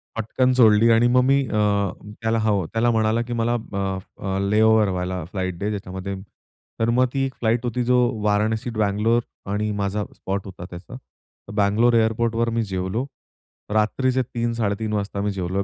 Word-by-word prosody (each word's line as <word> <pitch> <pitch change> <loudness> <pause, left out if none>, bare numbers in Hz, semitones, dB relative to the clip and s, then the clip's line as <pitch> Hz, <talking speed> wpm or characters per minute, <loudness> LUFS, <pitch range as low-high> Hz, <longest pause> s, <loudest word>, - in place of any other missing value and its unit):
पटकन 125 +3 +1
सोडली 115 -2 +5
आणि 115 +1 +5
मग 125 +1 +4
मी 135 +2 +4
अ, 105 - -2 0.6
त्याला 115 0 +1
हो, 100 -4 +1
त्याला 115 +7 +1
म्हणाला, 110 0 +1
की 120 0 -4
मला 115 0 0 0.2
अ, 95 -1 -1 0.3
अ, 95 -1 -1
लेओव्हर 110 0 +4
वाला 90 -1 -3
फ्लाइट 95 -3 -3
दे 100 +4 -2
ज्याच्यामध्ये 100 -1 -5 0.6
तर 115 0 +1
मग 125 +2 +3
ती 135 -1 0
एक 135 - -4
फ्लाइट 115 +1 +1
होती. 120 +1 -1
जो 125 +1 +3 0.3
वाराणसी, 110 +3 +1
बँगलोर 110 +2 +1 0.3
आणि 105 +1 -1
माझा 100 +1 -1
स्पॉट 100 0 -4
होता 95 -2 -9
त्याचा. 90 +8 -10 0.6
बँगलोर 105 +4 +3
एअरपोर्टवर 115 +1 +1
मी 115 - +2
जेवलो. 95 +4 -2 0.7
रात्रीचे 130 +4 +1
3-3:30 115 -3 -2
वाजता 100 -1 -2
मी 105 0 0
जेवलो 95 0 -2
110 Hz, 160 wpm, -23 LUFS, 100-115 Hz, 0.7 s, सोडली